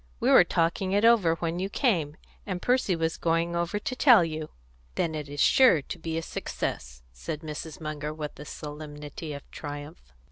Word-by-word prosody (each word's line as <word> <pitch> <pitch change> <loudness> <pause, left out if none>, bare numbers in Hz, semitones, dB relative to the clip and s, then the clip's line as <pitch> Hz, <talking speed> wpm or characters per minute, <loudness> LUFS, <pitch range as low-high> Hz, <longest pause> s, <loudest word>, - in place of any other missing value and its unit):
We - - +2
were - - +9
talking 170 +3 0
it 205 +2 +3
over 205 -9 +5
when 165 +1 -3
you 190 +1 -2
came, 170 - 0 0.3
and 185 -3 -4
Percy 245 -4 +2
was 165 0 -1
going 170 +1 0
over 170 +4 -1
to 245 +5 -4
tell 245 - +6
you." 155 -1 -5 0.5
"Then 165 - 0
it 150 -2 -5
is 145 0 -7
sure 250 - +5
to 175 - -7
be 160 0 -3
a 165 - -2
success," 60 - -5
said 105 - -6
Mrs. 155 0 -7
Munger, 155 -1 -4
with 155 -2 -7
a 150 - -8
solemnity 150 +1 -7
of 140 -1 -8
triumph. 145 - -8
160 Hz, 185 wpm, -27 LUFS, 150-180 Hz, 0.5 s, were